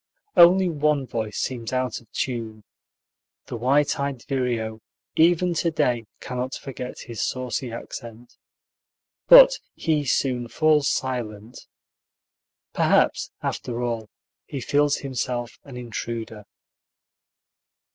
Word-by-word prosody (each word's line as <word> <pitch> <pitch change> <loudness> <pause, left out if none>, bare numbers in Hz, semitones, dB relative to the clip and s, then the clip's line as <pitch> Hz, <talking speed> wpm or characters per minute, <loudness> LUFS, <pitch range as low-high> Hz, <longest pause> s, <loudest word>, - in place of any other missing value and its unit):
Only 185 +2 +7
one 150 -3 +1
voice 110 -3 -4
seems 120 -3 -3
out 130 -2 -1
of 115 - -25
tune: 115 -4 -4 0.8
the - - -6
white 135 +6 +2
eyed 140 -3 -3
vireo, 120 -5 -2 0.3
even 175 +2 +4
to 170 +1 +1
day, 120 -7 0
cannot 125 +1 -4
forget 130 -2 -7
his 115 -3 -6
saucy 130 -1 -2
accent. 115 0 -9 0.9
But - - +9 0.2
he 155 -3 0
soon 125 -2 0
falls 150 +2 +3
silent. 120 -4 -4 1.1
Perhaps, - - +2
after 120 0 -3
all, 115 -3 -3 0.4
he 140 - -5
feels 145 +3 +2
himself 125 -3 -4
an 135 -3 -9
intruder. 115 -2 -6
125 Hz, 105 wpm, -24 LUFS, 115-145 Hz, 1.1 s, But